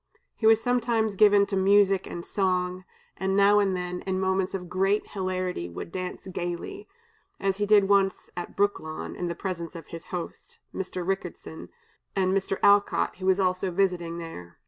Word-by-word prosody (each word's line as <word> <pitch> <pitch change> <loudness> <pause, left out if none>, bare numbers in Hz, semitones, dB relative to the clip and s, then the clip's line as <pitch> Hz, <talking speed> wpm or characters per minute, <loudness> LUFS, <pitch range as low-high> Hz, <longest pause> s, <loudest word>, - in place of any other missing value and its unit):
He 220 - +1
was 225 0 +6
sometimes 230 -3 0
given 205 0 +6
to 200 0 -3
music 195 0 +4
and 170 - -6
song, 185 -1 -1 0.3
and 190 +1 0
now 200 +1 +6
and 195 -2 +1
then, 180 0 -4
in 190 0 0
moments 190 0 0
of 180 -2 -5
great 195 +4 0
hilarity, 185 - -2
would 85 - -7
dance 185 0 -5
gayly, 180 - -5 0.5
as 195 -1 0
he 205 0 0
did 205 -2 +5
once 195 -1 +2
at 175 - -6
Brooklawn, 200 -6 -1
in 175 - -3
the 170 - -3
presence 175 -3 -5
of 165 -2 -9
his 165 -1 -8
host, 175 -2 -7 0.2
Mr. 185 -2 -4
Ricketson, 195 0 -4 0.5
and 190 -1 +2
Mr. 195 0 -1
Alcott, 205 0 +3
who 185 0 -4
was 190 +1 +4
also 185 0 +1
visiting 175 -2 0
there. 90 - -9
190 Hz, 170 wpm, -27 LUFS, 180-200 Hz, 0.5 s, was